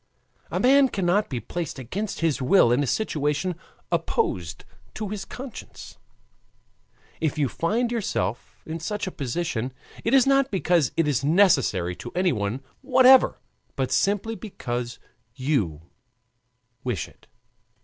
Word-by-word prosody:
A - - -2
man 270 +2 +5
cannot 195 +1 +1
be 125 - -2
placed 165 +7 -5
against 185 - -4
his 160 -4 +1
will 130 -2 +5
in 125 +4 +3
a 140 - 0
situation 150 - 0 0.4
opposed 85 -3 -1 0.3
to 215 -2 -4
his 200 -2 -5
conscience. 255 +1 -9 1.2
If 155 -1 -1
you 145 -2 +2
find 225 - 0
yourself 120 - -2
in 160 +1 -5
such 205 +6 -3
a 185 - -4
position 135 -3 -3 0.3
it 230 +4 +3
is 265 - +6
not 275 0 +3
because 175 -7 +2
it 165 -2 +3
is 140 -3 +1
necessary 140 - +3
to 120 - -8
anyone 130 - 0 0.2
whatever, 260 -1 +6 0.4
but 130 -1 -1
simply 200 +10 +1
because 120 - -5 0.4
you 115 - -1 1.0
wish 120 - -2
it. - - -22
165 Hz, 130 wpm, -25 LUFS, 125-210 Hz, 1.2 s, is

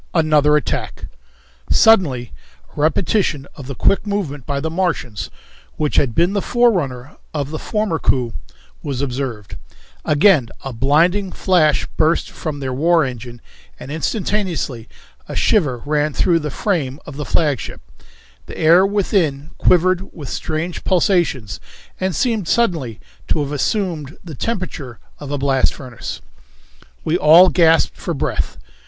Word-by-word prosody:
Another 150 -2 +4
Attack. 150 - -3 0.6
Suddenly 145 - +4 0.4
a 145 - -3
repetition 160 -2 +1
of 135 - -10
the 135 - -5
quick 200 - +1
movement 155 -10 -3
by 140 -1 -1
the 160 +3 -3
Martians, 165 - -2 0.5
which 150 -1 -1
had 125 -5 +2
been 175 +3 +3
the 200 - 0
forerunner 165 - 0 0.2
of 145 -1 -2
the 155 - -4
former 210 -7 -1
coup, 125 -4 0 0.5
was 140 -2 -3
observed; 125 -6 -4 0.5
again 150 - +4
a 135 - -5
blinding 170 - +2
flash 165 -6 +2
burst 160 +2 +1
from 150 -3 -5
their 130 -2 -3
war 165 +3 +3
engine 120 -2 -7 0.4
and 135 - -8
instantaneously 165 - -2 0.4
a - - -5
shiver 145 - +1
ran 150 0 0
through 170 +2 +2
the 150 -1 -4
frame 145 -5 -2
of 145 - -9
the 150 - -4
flagship; 145 -4 -1 0.7
the - - -9
air 170 +3 +5
within 185 -8 0
quivered 185 +1 +2
with 145 -5 -9
strange 160 +3 -3
pulsations 170 - +1 0.4
and 185 -2 -1
seemed 225 - 0
suddenly 160 - 0 0.3
to - - +1
have 140 - -5
assumed 155 -2 -2
the 170 -4 -9
temperature 155 - -4 0.2
of 145 - -8
a 145 - -2
blast 135 -1 +1
furnace. 125 - -7 0.8
We 165 +3 +1
all 170 +5 +7
gasped 165 -2 +3
for - - -4
breath. - - -2
155 Hz, 140 wpm, -19 LUFS, 135-180 Hz, 0.8 s, all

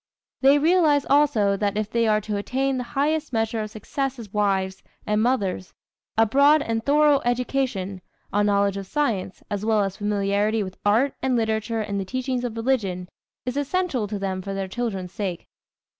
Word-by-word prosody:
They 275 +2 +6
realize 310 -2 +3
also 270 -9 +4
that 205 0 -1
if 215 -1 -1
they 230 -1 +2
are 215 -1 +3
to 210 0 -3
attain 260 +6 -1
the - - -2
highest 305 +1 +1
measure 225 -1 0
of 215 - -4
success 270 +5 -3
as 215 -5 -10
wives 195 -2 0 0.2
and 210 0 +1
mothers, 200 -7 -1 0.4
a 225 - +6
broad 285 +6 +4
and 225 -2 -2
thorough 290 +1 +4
education 240 -6 -1 0.3
a 205 +1 +3
knowledge 200 -1 +2
of 195 -1 -6
science, 215 -10 -2
as 205 0 -2
well 215 -1 +2
as 195 -1 -3
familiarity 205 +1 0
with 185 -1 -8
art 230 +7 +3
and 260 -1 +1
literature 220 0 0
and 200 -1 -3
the 195 - -3
teachings 255 +2 -2
of 235 -2 -4
religion 200 -7 -1 0.4
is 250 0 -3
essential 285 - -1
to 205 0 -4
them 190 -1 -3
for 195 +1 -5
their 195 -1 -3
children's 195 -4 -3
sake. 190 -4 -4
220 Hz, 180 wpm, -24 LUFS, 200-265 Hz, 0.4 s, They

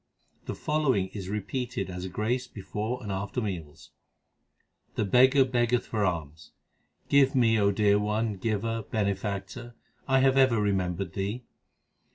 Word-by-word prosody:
The - - -4
following 135 -11 0
is 95 -3 -7
repeated 105 +1 -3
as 90 0 -5
a - - -5
grace 120 +7 -1
before 110 +4 -5
and 105 - -4
after 100 +5 -3
meals: 85 -9 -6 1.0
The 110 - 0
beggar 130 +6 +5
beggeth 120 -1 +1
for 110 -2 -1
alms, 80 -4 -4 0.5
Give 140 0 +4
me, 115 -3 +4
O 100 -1 +4
dear 105 0 +3
One; 105 +1 0
Giver, 115 +2 -1
Benefactor, 100 +2 -3 0.3
I 135 -1 +4
have 135 0 +4
ever 130 -4 +4
remembered 95 -3 -1
Thee. 105 +5 -3
105 Hz, 140 wpm, -28 LUFS, 95-125 Hz, 1.0 s, beggar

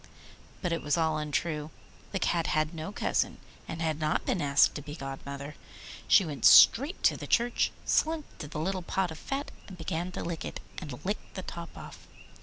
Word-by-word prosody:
But 180 - 0
it 165 - -1
was 145 +1 +1
all 160 -2 +1
untrue. 150 0 -2 0.4
The 195 - -1
Cat 170 -3 +1
had 155 +1 +1
no 160 +3 -5
cousin, - - 0 0.3
and 165 0 -4
had 160 -1 -1
not 155 0 0
been 180 - 0
asked 140 -1 +4
to 145 - -5
be 145 0 -8
godmother. 140 0 -6 0.5
She 195 - +6
went 145 -4 -6
straight 285 +10 +7
to - - +5
the - - -7
church, 240 0 +2
slunk 315 -1 +1
to 150 - -6
the 150 - -7
little 185 +3 -1
pot 180 0 -1
of 160 - -8
fat, 275 +1 -4 0.3
began 175 +1 -3
to - - -4
lick 170 -1 -4
it, - - -5 0.2
and 145 -4 -8
licked 205 +3 -4
the 185 - -4
top 170 -2 -8
off. - - -11
165 Hz, 195 wpm, -29 LUFS, 150-185 Hz, 0.5 s, straight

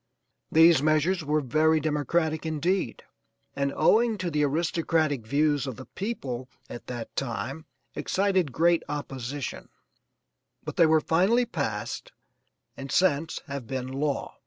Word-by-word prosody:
These 165 -2 +6
measures 155 +4 +2
were 150 +1 +1
very 155 +4 +3
democratic 155 +1 0
indeed 160 -2 -1 0.5
and 140 0 0
owing 220 +7 +3
to 180 -2 -3
the 150 -1 +1
aristocratic 155 -4 0
views 145 +1 +1
of 130 - -4
the 130 - -10
people 135 - -5 0.2
at 120 - -9
that 120 -2 -6
time, 135 +4 -4 0.3
excited 190 -6 0
great 170 +5 +3
opposition, 140 -2 -5 0.9
but - - -6
they 165 - +5
were 160 0 +4
finally 195 +11 +3
passed 110 - -4 0.6
and 135 0 -7
since 165 -4 +1
have 140 -5 -6
been 130 0 -4
law. 140 +1 -2
155 Hz, 130 wpm, -27 LUFS, 135-165 Hz, 0.9 s, These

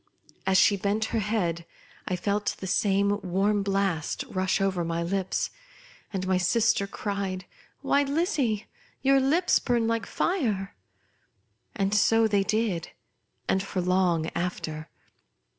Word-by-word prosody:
As 190 0 +4
she 200 +1 +5
bent 205 +3 0
her 225 - +2
head, 190 -6 -1 0.4
I 185 - 0
felt 205 +3 -1
the - - -7
same 200 +1 +2
warm 195 +3 +1
blast 195 -5 -1
rush 185 0 0
over 190 -3 0
my 165 0 -2
lips, 190 +2 -1 0.6
and 190 -3 -3
my 185 -1 +2
sister, 220 +2 +2
cried, 195 -3 -3 0.2
" - - -36
Why 280 - +3
Lizzie, 280 - 0 0.4
your 275 0 +5
lips 310 +7 +3
burn 240 -3 +1
like 230 -2 -1
fire!" 220 - -1 1.0
And 195 0 0
so 225 +2 +4
they 205 -2 +2
did, 205 -4 -1 0.6
and 190 - +2
for 195 -1 -4
long 180 -3 +1
after. 160 -3 -4
200 Hz, 135 wpm, -27 LUFS, 185-220 Hz, 1.0 s, she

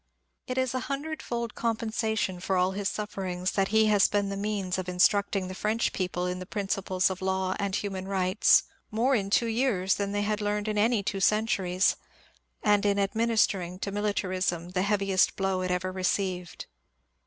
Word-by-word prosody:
It 255 - -3
is 260 -1 +1
a 255 - 0
hundredfold 275 -5 -3
compen 230 -1 -2
sation 220 -5 -1
for 190 0 0
all 180 +1 +2
his 195 0 -2
sufferings 190 -3 -3
that 195 -1 +1
he 220 +1 +4
has 210 -2 +5
been 205 -1 0
the 195 - -3
means 200 -2 -2
of 185 -1 -4
instructing 195 +1 +2
the 185 - -6
French 215 +4 0
people 180 -1 -2
in 180 0 -2
the 185 - -8
principles 195 -2 0
of 190 - -6
law 190 0 0
and 200 -1 -1
human 190 -2 -3
rights 190 +1 +4 0.3
more 235 +5 +1
in 200 -5 0
two 235 - +3
years 225 -5 +1
than 200 -1 -2
they 205 0 0
had 210 +1 -1
learned 210 0 -1
in 210 -1 0
any 220 -1 +2
two 195 0 -2
centuries, 190 -3 +2 0.7
and 205 -1 +3
in 200 -1 +2
administering 200 -3 +1
to 200 +1 -4
Militarism 185 -4 -1
the 185 0 -1
heavi 200 0 0
est 185 - +3
blow 190 -1 0
it 185 - -2
ever 180 +1 -1
received. 185 -1 -2
200 Hz, 185 wpm, -28 LUFS, 185-215 Hz, 0.7 s, has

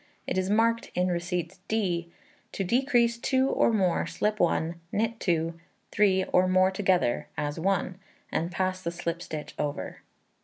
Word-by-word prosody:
It - - -2
is 185 0 0
marked 230 +2 +2
in 180 +1 +2
receipts 175 0 -2
d. 180 -6 -1 0.4
To 195 - -1
decrease 235 +2 +2
2 260 +2 +2
or - - +3
more, 190 -6 +1
slip 210 0 -1
1, 170 -1 +1
knit 225 +2 -1
2, 165 -2 0 0.3
3, 190 -2 +3
or 185 0 +5
more 185 +1 +4
together, 190 -9 +1
as 145 +2 -2
one, 190 +1 0 0.3
and 170 +2 -1
pass 185 0 -1
the 170 - -2
slip 170 0 -4
stitch 155 -3 -6
over. 145 -1 -3
185 Hz, 155 wpm, -28 LUFS, 170-210 Hz, 0.4 s, or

